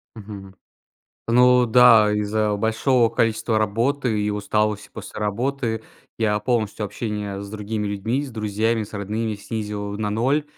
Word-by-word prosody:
Мгм. 100 Hz, -3 st, -10 dB, 0.7 s
Ну 125 Hz, +1 st, +5 dB
да, 115 Hz, -3 st, +6 dB
из-за 105 Hz, 0 st, 0 dB
большого 115 Hz, +3 st, +2 dB
количества 115 Hz, 0 st, 0 dB
работы 115 Hz, +2 st, 0 dB
и 105 Hz, -, 0 dB
усталости 105 Hz, 0 st, -1 dB
после -, -, -8 dB
работы 110 Hz, +2 st, -2 dB, 0.4 s
я 105 Hz, -2 st, +1 dB
полностью 110 Hz, -2 st, -1 dB
общение 105 Hz, -1 st, -4 dB
с 100 Hz, -, -8 dB
другими 105 Hz, 0 st, -3 dB
людьми, 105 Hz, +7 st, -1 dB
с 140 Hz, -, -7 dB
друзьями, 110 Hz, +1 st, -1 dB
с 105 Hz, -, -10 dB
родными 105 Hz, +2 st, -3 dB
снизил 105 Hz, -1 st, -5 dB
на 105 Hz, -1 st, -2 dB
0. 135 Hz, +8 st, +1 dB
110 Hz, 135 wpm, -22 LUFS, 105-115 Hz, 0.7 s, да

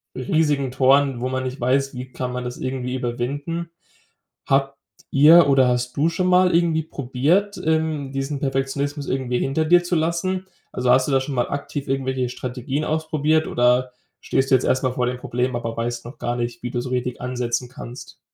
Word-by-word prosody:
riesigen 140 Hz, 0 st, +1 dB
Toren, 135 Hz, 0 st, +3 dB
wo 125 Hz, +1 st, -2 dB
man 130 Hz, 0 st, -2 dB
nicht 130 Hz, +2 st, -5 dB
weiß: 135 Hz, +2 st, +1 dB
Wie 125 Hz, 0 st, -7 dB
kann 125 Hz, 0 st, -4 dB
man 125 Hz, 0 st, -4 dB
das 125 Hz, 0 st, -5 dB
irgendwie 130 Hz, -1 st, -3 dB
überwinden. 140 Hz, +7 st, -3 dB, 0.8 s
Habt 135 Hz, 0 st, +1 dB, 0.3 s
ihr 155 Hz, +3 st, +7 dB
oder 135 Hz, -2 st, +5 dB
hast 125 Hz, 0 st, -1 dB
du 155 Hz, +4 st, +3 dB
schon 180 Hz, +2 st, -1 dB
mal 180 Hz, 0 st, +4 dB
irgendwie 165 Hz, -2 st, +2 dB
probiert, 150 Hz, +8 st, 0 dB
ähm, 160 Hz, -3 st, 0 dB
diesen 135 Hz, +1 st, -3 dB
Perfektionismus 140 Hz, +1 st, -2 dB
irgendwie 130 Hz, -2 st, -1 dB
hinter 140 Hz, +4 st, 0 dB
dir 175 Hz, +2 st, +5 dB
zu 175 Hz, 0 st, -1 dB
lassen? 170 Hz, +3 st, -1 dB, 0.3 s
Also, 125 Hz, 0 st, +1 dB
hast 130 Hz, +1 st, +4 dB
du -, -, -1 dB
da 135 Hz, -, +4 dB
schon 135 Hz, +1 st, -4 dB
mal 120 Hz, -1 st, 0 dB
aktiv 140 Hz, 0 st, -4 dB
irgendwelche 130 Hz, -2 st, -1 dB
Strategien 130 Hz, +4 st, -4 dB
ausprobiert 155 Hz, 0 st, +1 dB
oder 125 Hz, +1 st, +2 dB, 0.3 s
stehst 135 Hz, +1 st, 0 dB
du -, -, +8 dB
jetzt 130 Hz, -, +1 dB
erstmal 130 Hz, -1 st, +1 dB
vor 125 Hz, -1 st, 0 dB
dem 125 Hz, 0 st, -2 dB
Problem, 125 Hz, +1 st, -2 dB
aber 115 Hz, -1 st, -3 dB
weißt 120 Hz, 0 st, -3 dB
noch 120 Hz, -, -10 dB
gar 120 Hz, 0 st, -2 dB
nicht, 120 Hz, -1 st, -4 dB
wie 120 Hz, -, -3 dB
du 120 Hz, -, -2 dB
so 125 Hz, -, -6 dB
richtig 125 Hz, -1 st, -2 dB
ansetzen 125 Hz, 0 st, -2 dB
kannst? 125 Hz, -1 st, -10 dB
135 Hz, 190 wpm, -22 LUFS, 125-150 Hz, 0.8 s, du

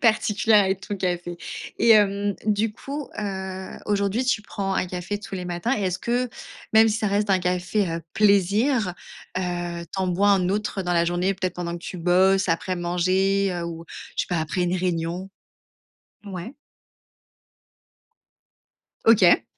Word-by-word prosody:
particulières 215 Hz, -2 st, +4 dB
avec 190 Hz, 0 st, -1 dB
ton 205 Hz, -, -3 dB
café, 175 Hz, -2 st, -2 dB, 0.4 s
et -, -, +3 dB
hem, 205 Hz, -1 st, +4 dB
du 215 Hz, +1 st, +1 dB
coup, 280 Hz, +3 st, -6 dB
heu, 190 Hz, -2 st, -4 dB, 0.2 s
aujourd'hui, 205 Hz, +3 st, +1 dB
tu 245 Hz, -4 st, +1 dB
prends 195 Hz, -1 st, -3 dB
un 185 Hz, -, 0 dB
café 180 Hz, +3 st, -4 dB
tous 200 Hz, -, -8 dB
les 180 Hz, -1 st, -4 dB
matins, 175 Hz, +9 st, -1 dB
et 205 Hz, -, -2 dB
est-ce 185 Hz, -1 st, -1 dB
que, 245 Hz, +1 st, 0 dB, 0.5 s
même 220 Hz, 0 st, +7 dB
si 215 Hz, 0 st, 0 dB
ça 220 Hz, -, 0 dB
reste 205 Hz, 0 st, +1 dB
un 190 Hz, -, +4 dB
café, 180 Hz, +2 st, 0 dB
heu, 165 Hz, 0 st, -3 dB
plaisir, 210 Hz, +2 st, +3 dB, 0.5 s
heu, 175 Hz, -1 st, -3 dB
tu 170 Hz, -, -8 dB
en 185 Hz, -, 0 dB
bois 195 Hz, +3 st, +2 dB
un 185 Hz, -2 st, +3 dB
autre 205 Hz, -1 st, -1 dB
dans 180 Hz, -1 st, -1 dB
la 170 Hz, 0 st, +3 dB
journée, 175 Hz, +3 st, +1 dB
peut 190 Hz, -1 st, -2 dB
être 180 Hz, -, -4 dB
pendant 175 Hz, -1 st, -4 dB
que 170 Hz, 0 st, -7 dB
tu 185 Hz, -, -6 dB
bosses, 185 Hz, +2 st, +3 dB
après 180 Hz, +2 st, -1 dB
manger, 185 Hz, +3 st, +1 dB
heu, 175 Hz, -1 st, -3 dB
ou 165 Hz, -1 st, -6 dB, 0.3 s
je -, -, +1 dB
sais -, -, -19 dB
pas, 175 Hz, -2 st, 0 dB
après 160 Hz, +3 st, -1 dB
une 175 Hz, +1 st, 0 dB
réunion? 180 Hz, +1 st, -2 dB, 1.0 s
Ouais. 195 Hz, +4 st, -6 dB, 2.5 s
OK. 205 Hz, -6 st, +6 dB
190 Hz, 170 wpm, -24 LUFS, 175-205 Hz, 2.5 s, même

